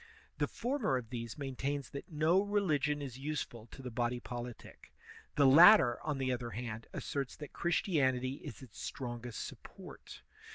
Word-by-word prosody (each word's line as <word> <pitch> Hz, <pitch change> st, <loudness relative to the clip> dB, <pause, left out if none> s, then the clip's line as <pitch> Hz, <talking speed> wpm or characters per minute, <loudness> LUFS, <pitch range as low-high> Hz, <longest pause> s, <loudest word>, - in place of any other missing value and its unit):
Th^ -, -, +1 dB
former 240 Hz, -, 0 dB
of 120 Hz, -2 st, -7 dB
these 115 Hz, -2 st, -5 dB
maintains 140 Hz, 0 st, -3 dB
that 140 Hz, -, -7 dB
no 160 Hz, +5 st, +3 dB
religion 155 Hz, -8 st, +1 dB
is 130 Hz, -2 st, -7 dB
useful 135 Hz, -6 st, -4 dB
to 135 Hz, -, -12 dB
the 125 Hz, -, -5 dB
body 120 Hz, +1 st, -1 dB
politic; 120 Hz, -1 st, -8 dB, 0.4 s
the 145 Hz, -, +5 dB
latter, 150 Hz, -, +8 dB
on 150 Hz, -3 st, -2 dB
the 130 Hz, -1 st, 0 dB
other 120 Hz, -1 st, -2 dB
hand, 115 Hz, -2 st, -6 dB
asserts 140 Hz, -2 st, -3 dB
that 150 Hz, -, -9 dB
Christianity 135 Hz, -7 st, +1 dB
is 130 Hz, -, -9 dB
its 120 Hz, -5 st, -13 dB
strongest 120 Hz, -2 st, -5 dB
support. -, -, -11 dB
135 Hz, 155 wpm, -34 LUFS, 120-150 Hz, 0.4 s, latter